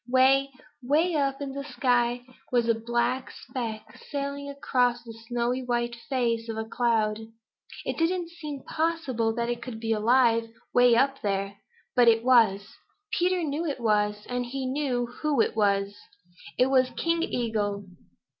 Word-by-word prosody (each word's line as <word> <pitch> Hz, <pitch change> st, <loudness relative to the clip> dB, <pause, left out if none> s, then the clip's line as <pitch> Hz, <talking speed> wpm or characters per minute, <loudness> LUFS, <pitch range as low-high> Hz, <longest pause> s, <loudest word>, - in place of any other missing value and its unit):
Way, 265 Hz, +2 st, +4 dB, 0.3 s
way 305 Hz, +8 st, +2 dB
up 275 Hz, -2 st, 0 dB
in 275 Hz, -, -4 dB
the 280 Hz, +1 st, -5 dB
sky 245 Hz, -2 st, 0 dB, 0.3 s
was 240 Hz, -2 st, +2 dB
a 230 Hz, -, +4 dB
black 235 Hz, +3 st, -1 dB
speck 235 Hz, -4 st, -6 dB, 0.3 s
sailing 280 Hz, 0 st, -3 dB
across 250 Hz, -3 st, 0 dB
the 230 Hz, -1 st, -9 dB
snowy 245 Hz, +1 st, -1 dB
white 240 Hz, -1 st, -1 dB, 0.2 s
face 235 Hz, -3 st, 0 dB
of 225 Hz, -, -4 dB
a 220 Hz, -, -3 dB
cloud. 220 Hz, -2 st, +1 dB, 0.7 s
It -, -, -3 dB
didn't 340 Hz, +1 st, 0 dB
seem 300 Hz, -5 st, -7 dB
possible 310 Hz, -9 st, -1 dB
that 235 Hz, 0 st, -1 dB
it 240 Hz, 0 st, -3 dB
could 235 Hz, -3 st, -7 dB
be 225 Hz, 0 st, -2 dB
alive 230 Hz, +1 st, +3 dB, 0.2 s
way 245 Hz, -1 st, +6 dB
up 270 Hz, +3 st, +2 dB
there. 200 Hz, 0 st, -2 dB, 0.4 s
But 245 Hz, -2 st, +5 dB
it 225 Hz, 0 st, +5 dB
was. 225 Hz, -6 st, +4 dB, 0.4 s
Peter 360 Hz, 0 st, +1 dB
knew 295 Hz, 0 st, -2 dB
that 290 Hz, -, 0 dB
it -, -, -12 dB
was, 210 Hz, -2 st, +1 dB
and 245 Hz, 0 st, -2 dB
he 265 Hz, +2 st, -4 dB
knew 255 Hz, -2 st, -1 dB
who 280 Hz, +3 st, -2 dB
it -, -, +2 dB
was. 200 Hz, -1 st, +1 dB, 0.6 s
It 255 Hz, +1 st, +3 dB
was 260 Hz, -1 st, +4 dB
King 335 Hz, 0 st, +1 dB
Eagle. 210 Hz, -7 st, -1 dB
245 Hz, 160 wpm, -27 LUFS, 230-275 Hz, 0.7 s, way